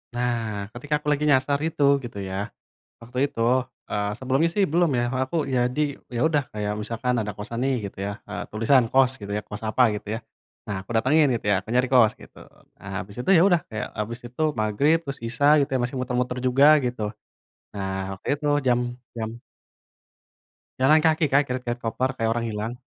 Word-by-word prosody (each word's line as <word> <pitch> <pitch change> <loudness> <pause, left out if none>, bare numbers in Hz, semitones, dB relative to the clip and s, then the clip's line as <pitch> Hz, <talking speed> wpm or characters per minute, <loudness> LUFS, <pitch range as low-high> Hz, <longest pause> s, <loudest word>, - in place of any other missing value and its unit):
Nah, 115 -4 -1
ketika 145 +5 -1
aku 150 - -11
lagi 145 +1 -2
nyasar 140 +1 +2
itu 145 -3 +2
gitu 120 -5 -8
ya, 100 +3 -3 0.5
waktu 125 +4 -1
itu, 125 -5 -5 0.5
eee, 105 0 -1
sebelumnya 135 +5 +1
sih 205 - +2
belum 170 +1 +3
ya 120 - +1 0.2
aku 130 - -7
ya 125 -2 +2
di 140 +3 -1 0.2
ya 120 - -1
udah 150 -3 +1
kayak 105 -1 -2
misalkan 115 +3 -1
ada 105 -1 -4
kosan 110 +4 -7
nih 135 -1 +2
gitu - - -30
ya, 100 - -2 0.2
eee, 105 - -4
tulisan 115 +3 +4
kost 130 0 +4
gitu 100 0 -5
ya, 105 - -1
kost 105 +1 -8
apa 115 +2 +3
gitu 105 - -12
ya. 110 - -3 0.5
Nah 100 - -1
aku - - -45
datengin 130 +7 +4
gitu 115 - -3
ya, 100 - +4
aku - - -44
nyari 125 0 +2
kos 120 -5 +5
gitu, - - -15 0.4
nah 100 - -10
habis 100 +1 -11
itu 125 - -3
ya 170 - +6
udah, 175 -3 +3
kayak 110 -1 -4
habis 115 +3 -3
itu 125 +6 -6 0.2
magrib 110 +10 +3
terus 140 -4 -6
isya 145 +6 +4
gitu 140 -2 +1
ya 130 - +2
masih 120 +2 -2
muter-muter 125 0 -1
juga 135 +4 +5
gitu, 125 -2 -3 0.7
nah 95 -1 -3
waktu 95 - -11
itu 150 +1 -5 0.2
jam 120 -1 +4 0.4
jam 110 -1 -3 1.5
Jalan 150 +4 +5
kaki, 160 -1 +3
Kak, 140 +2 +5
geret-geret 125 -1 -3
koper 125 +3 0
kayak 115 -2 0
orang 115 0 -2
hilang. 110 +2 -3
125 Hz, 195 wpm, -24 LUFS, 110-140 Hz, 1.5 s, ya